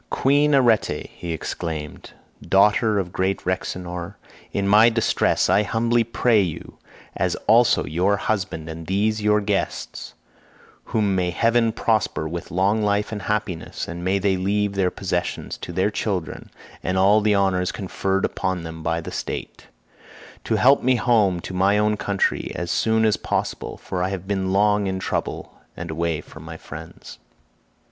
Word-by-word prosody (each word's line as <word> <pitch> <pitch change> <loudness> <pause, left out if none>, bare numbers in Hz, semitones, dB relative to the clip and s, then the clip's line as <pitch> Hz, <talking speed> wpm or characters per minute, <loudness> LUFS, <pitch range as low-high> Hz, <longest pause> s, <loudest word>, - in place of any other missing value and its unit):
"Queen 145 +2 +3
Arete," 120 -5 +2
he 85 - -6
exclaimed, 80 -2 -5 0.3
"daughter 105 +4 +3
of 90 -3 -2
great 95 +1 -1
Rhexenor, 90 0 -4 0.4
in 100 0 -1
my 105 +3 +7
distress 115 -1 +1
I 100 - +4
humbly 115 +3 +1
pray 115 -1 +2
you, 85 -5 -5 0.4
as - - 0
also 115 +2 +4
your 90 +6 +1
husband 90 -5 -2
and 80 0 -8
these 105 +3 0
your 105 0 +3
guests 100 -1 -3 0.7
(whom 105 -3 0
may 90 -1 +1
heaven 115 +4 +2
prosper 110 -9 0
with 85 +2 -6
long 100 +5 +1
life 105 0 0
and 105 -2 -4
happiness, 105 -6 -3
and 85 +1 -6
may 95 +2 +1
they 95 -1 +1
leave 100 +2 0
their 95 -2 +1
possessions 90 -2 -3
to - - -7
their 95 +4 +1
children, 100 -5 -3 0.3
and 95 - -1
all 100 +3 +5
the 105 -1 +3
honours 95 -2 +1
conferred 95 0 -1
upon 95 -2 -2
them 80 0 -7
by 85 +1 -1
the - - -7
state) - - -6 0.8
to 110 - +1
help 135 +6 +5
me 130 +1 +3
home 105 -6 +2
to 95 - -7
my 95 +3 +3
own 105 0 +2
country 100 -1 -1
as 85 -1 -3
soon 110 0 +2
as 110 - +2
possible; - - -3
for 90 - -4
I 90 - 0
have 95 -1 -5
been 95 -2 -1
long 105 +1 +3
in 95 0 -2
trouble 95 - -4 0.2
and 85 -1 -5
away 80 -1 -1
from - - -13
my - - -8
friends." - - -11
100 Hz, 160 wpm, -23 LUFS, 90-105 Hz, 0.8 s, my